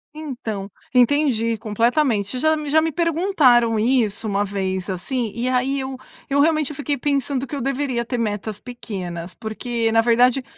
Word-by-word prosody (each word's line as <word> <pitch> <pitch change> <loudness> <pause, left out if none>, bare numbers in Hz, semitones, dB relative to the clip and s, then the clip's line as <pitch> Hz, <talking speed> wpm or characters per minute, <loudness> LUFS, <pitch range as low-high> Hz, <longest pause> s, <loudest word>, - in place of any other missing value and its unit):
Então, 230 -10 -5 0.2
entendi 245 -3 +3
completamente, 230 +1 0
já 315 +2 +3
me 300 -2 -5
já 315 +2 +4
me 325 0 0
perguntaram 295 - +3
isso 225 -3 +1
uma 200 0 +1
vez 190 -1 -3
assim. 225 +5 -2
E 240 +2 -2
aí 260 +2 +1
eu 265 0 -4 0.3
eu 280 +1 +2
realmente 310 -1 +2
eu - - -7
fiquei 290 -1 -2
pensando 275 -1 -1
que 285 - -6
eu 275 - -3
deveria 265 -2 -1
ter 245 0 -3
metas 210 -2 -3
pequenas, 185 -8 -7
porque 225 +1 -2
na 225 0 +4
verdade 245 +3 +3
245 Hz, 165 wpm, -21 LUFS, 220-280 Hz, 0.3 s, já